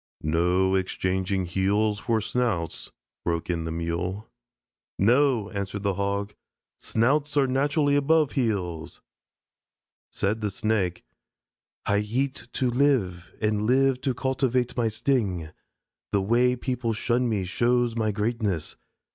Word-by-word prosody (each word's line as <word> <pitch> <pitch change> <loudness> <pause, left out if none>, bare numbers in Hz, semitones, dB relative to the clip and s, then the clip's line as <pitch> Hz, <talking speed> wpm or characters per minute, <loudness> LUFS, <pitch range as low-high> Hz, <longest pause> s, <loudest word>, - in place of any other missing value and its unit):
"No 90 +4 +2
exchanging 95 0 0
heels 100 +4 +1
for 115 -1 0
snouts," 110 -8 -2 0.3
broke 85 0 -1
in 85 -2 -2
the 80 - -3
Mule. 85 +5 -3 0.7
"No," 120 0 +3
answered 100 0 -4
the 100 -1 +1
Hog; 100 +1 -2 0.5
"snouts 145 +6 +1
are 140 - +5
naturally 145 +2 +2
above 150 +1 +3
heels." 95 - -2 1.1
Said 105 +3 -1
the 105 - 0
Snake: 100 -3 -1 0.8
"I 100 0 +2
eat 130 +6 -2
to 125 -2 0
live, 115 -10 +1
and 105 -1 0
live 130 +1 +3
to 130 -2 -1
cultivate 130 -1 0
my 120 -2 +1
sting. 105 - 0 0.6
The 100 - +2
way 120 +4 +3
people 125 -2 -2
shun 120 +3 0
me 100 -4 0
shows 120 +4 +1
my 110 -2 +1
greatness. 105 -6 -2
110 Hz, 120 wpm, -26 LUFS, 95-125 Hz, 1.1 s, are